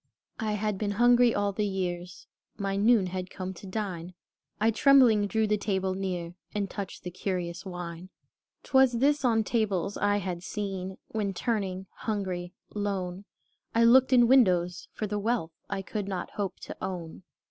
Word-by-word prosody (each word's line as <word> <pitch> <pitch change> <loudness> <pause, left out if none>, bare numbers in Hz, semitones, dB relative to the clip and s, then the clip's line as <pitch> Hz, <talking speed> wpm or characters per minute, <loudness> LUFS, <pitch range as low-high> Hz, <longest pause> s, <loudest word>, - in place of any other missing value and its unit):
I 215 -2 -1
had 210 -1 -1
been 205 -1 -1
hungry 240 +2 +5
all 205 0 +1
the 210 +2 -1
years; 180 -2 -4 0.3
My 195 -1 -1
noon 210 0 +4
had 185 0 -4
come, 185 -1 -5
to 190 +2 -11
dine; 185 -4 -4 0.4
I, 220 +2 +3
trembling, 240 -5 +5
drew 220 +2 +1
the 210 0 +1
table 190 -2 0
near, 180 -3 -3 0.2
And 205 -1 0
touched 195 -1 -6
the 180 - -5
curious 180 0 -3
wine. 175 0 -6 0.5
'T - - -17
was 265 -2 +6
this 280 +5 +2
on 225 -3 +3
tables 205 -4 0
I 205 0 +2
had 180 -3 -3
seen, 190 -1 -4
When 205 -3 -2
turning, 190 -4 -2
hungry, 185 -5 -3 0.2
lone, 195 -2 -3 0.5
I 230 - +5
looked 255 +3 +6
in 240 -2 +6
windows, 180 -9 +3
for 215 - -4
the 210 0 -2
wealth 215 -6 0 0.2
I 195 -1 -3
could 205 0 -4
not 185 -3 -4
hope 200 -2 -4
to - - -7
own. 175 -3 -5
200 Hz, 170 wpm, -28 LUFS, 185-220 Hz, 0.5 s, was